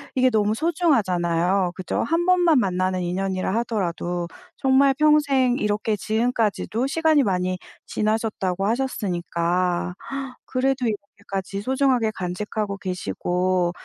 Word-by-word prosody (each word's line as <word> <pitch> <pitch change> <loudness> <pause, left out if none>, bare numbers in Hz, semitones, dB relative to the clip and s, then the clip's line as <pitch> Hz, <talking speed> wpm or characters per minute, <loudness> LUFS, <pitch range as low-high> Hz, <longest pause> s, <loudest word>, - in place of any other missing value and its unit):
이게 255 0 +4
너무 215 -2 +2
소중하잖아요. 195 - +1
그죠? 185 - -2
1 330 +7 0
번만 350 -5 +5
만나는 185 -2 0
인연이라 185 +2 -1
하더라도 175 -6 -2 0.3
정말 270 +1 +4
"평생 285 -5 +4
이렇게 210 +1 0
지금까지도 225 +1 0
시간이 315 -1 +3
많이 185 -3 0 0.3
지나셨다"고 210 -3 -1
하셨으니까 180 -7 -1 0.5
그래도 265 0 0
이렇게까지 200 -2 -4
소중하게 255 -2 +1
간직하고 200 +3 -3
계시고 180 - -1
210 Hz, 310 characters per minute, -23 LUFS, 185-255 Hz, 0.5 s, 번만